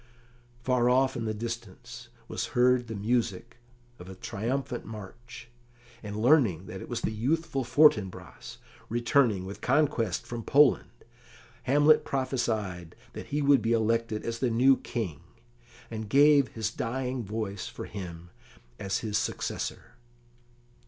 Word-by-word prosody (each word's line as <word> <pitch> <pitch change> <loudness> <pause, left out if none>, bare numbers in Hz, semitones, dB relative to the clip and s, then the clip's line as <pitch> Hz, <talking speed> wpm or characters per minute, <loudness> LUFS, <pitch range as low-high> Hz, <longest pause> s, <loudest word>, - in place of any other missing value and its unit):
Far 125 -1 +2
off 130 +1 +3
in 115 -2 -3
the 110 - -1
distance 120 +2 -7 0.2
was - - -3
heard 125 0 +4
the 110 - -5
music 115 +1 -2 0.4
of 90 - -10
a 95 - -9
triumphant 120 +6 -3
march, 110 +3 -10 0.5
and 105 -1 -7
learning 115 - +3
that 95 0 -8
it - - -9
was 120 - -3
the - - -1
youthful 135 +5 -1
Fortinbras, 120 -6 +1 0.3
returning 120 -4 +2
with 100 +2 -8
conquest 125 - +1
from 120 -1 -5
Poland, 140 +4 +4 0.8
Hamlet 145 +3 +5
prophesied 110 -10 -2 0.2
that - - -8
he 145 +1 -1
would 140 -1 +5
be 115 +1 +1
elected 115 -1 0
as 115 0 -3
the 130 - +1
new 130 +4 +5
King, 100 - -5 0.7
and 110 -2 -5
gave 145 +1 +5
his 110 -3 -3
dying 125 +1 -3
voice 105 -1 -4
for - - -7
him 90 -3 -8 0.5
as 95 -1 -2
his 105 -1 0
successor. 115 +2 -4
115 Hz, 135 wpm, -28 LUFS, 105-130 Hz, 0.8 s, Hamlet